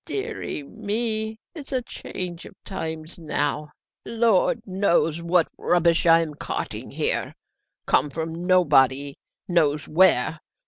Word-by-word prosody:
"Deary 400 - -4
me! 220 +3 -3 0.2
it's 300 -5 -9
a 255 -2 0
change 180 -6 -6
of - - -15
times 160 -3 -6
now! 150 -1 -2 0.3
Lord 230 +1 +2
knows 180 -4 +1
what 170 0 +2
rubbish 170 -1 +2
I 165 0 +7
am 160 -2 -4
carting - - -5
here, - - -1 0.5
come 150 - +2
from 165 +3 -5
nobody 140 -6 +4 0.3
guesses 150 -5 +1
where! 165 -3 +4
170 Hz, 120 wpm, -24 LUFS, 155-205 Hz, 0.5 s, I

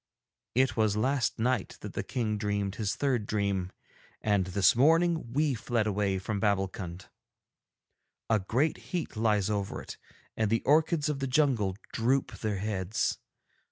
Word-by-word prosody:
'It 130 -3 +3
was 110 -2 +2
last 130 +3 +1
night 120 -2 0
that - - -7
the - - -2
King 115 -5 -2
dreamed 100 -2 -1
his 105 -2 -2
third 125 -7 0
dream, 100 -3 -1 0.5
and 100 -3 +1
this 95 +1 +4
morning 160 0 +3
we 145 +2 +2
fled 115 -1 -1
away 100 -2 0
from 100 +2 -3
Babbulkund. 95 -3 -1 1.2
A 110 -1 +3
great 125 +11 0
heat 175 -8 -3
lies 105 -3 +2
over 100 -2 -2
it, - - -9 0.4
and 110 -2 +1
the 115 +1 +1
orchids 155 +1 +3
of 150 -2 -1
the 135 - -1
jungle 125 -9 +2 0.2
droop 125 +3 +1
their 105 -2 -1
heads. 100 0 -1
110 Hz, 150 wpm, -29 LUFS, 100-130 Hz, 1.2 s, this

